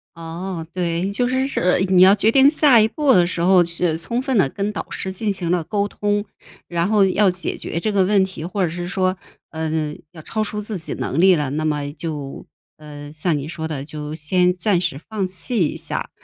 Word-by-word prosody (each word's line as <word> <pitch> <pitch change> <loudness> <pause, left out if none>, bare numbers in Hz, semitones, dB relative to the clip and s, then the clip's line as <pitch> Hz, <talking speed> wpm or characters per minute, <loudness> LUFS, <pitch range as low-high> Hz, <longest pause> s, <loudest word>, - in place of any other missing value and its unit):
哦， 165 +1 -6
对， 175 +1 -1
就 245 +4 0
是 260 +1 0
是 180 -10 +1
你 185 -1 +5
要 190 +2 +8
决 210 +2 +3
定 270 +2 +6
下 290 -5 +5
一 215 - +4
步 270 +4 +2
的 175 -4 +4
时 175 - -4
候， 180 0 +5
是 170 -1 -1
充 235 +8 -2
分 265 0 -1
地 165 -9 +3
跟 200 +7 -3
导 210 - -6
师 190 - -4
进 210 +2 -1
行 180 -3 -3
了 175 -2 +1
沟 200 +4 -1
通， 205 0 -1 0.4
然 170 +1 0
后 210 -1 +4
要 195 +1 +3
解 180 0 -2
决 170 - -4
这 215 +5 -1
个 200 -2 +3
问 195 0 +3
题， 185 -4 -8
或 190 +3 -2
者 175 - +1
是 175 +2 -5
说， 185 0 0 0.4
呃， 160 -1 -2 0.2
要 165 -3 -12
超 215 +5 -2
出 210 0 -4
自 210 -1 -4
己 160 - -5
能 155 - -1
力 190 0 +6
了， 145 -4 -2
那 155 +2 -2
么 145 -2 -1
就 150 -3 -6 0.3
呃， 145 -1 -10
像 155 +1 -1
你 140 +1 -5
说 160 0 -5
的， 145 -3 -5
就 150 0 -6
先 180 +4 +2
暂 180 0 +1
时 165 -6 -2
放 210 -4 -2
弃 185 - 0
一 - - -6
下。 - - -4
180 Hz, 240 characters per minute, -20 LUFS, 160-205 Hz, 0.4 s, 要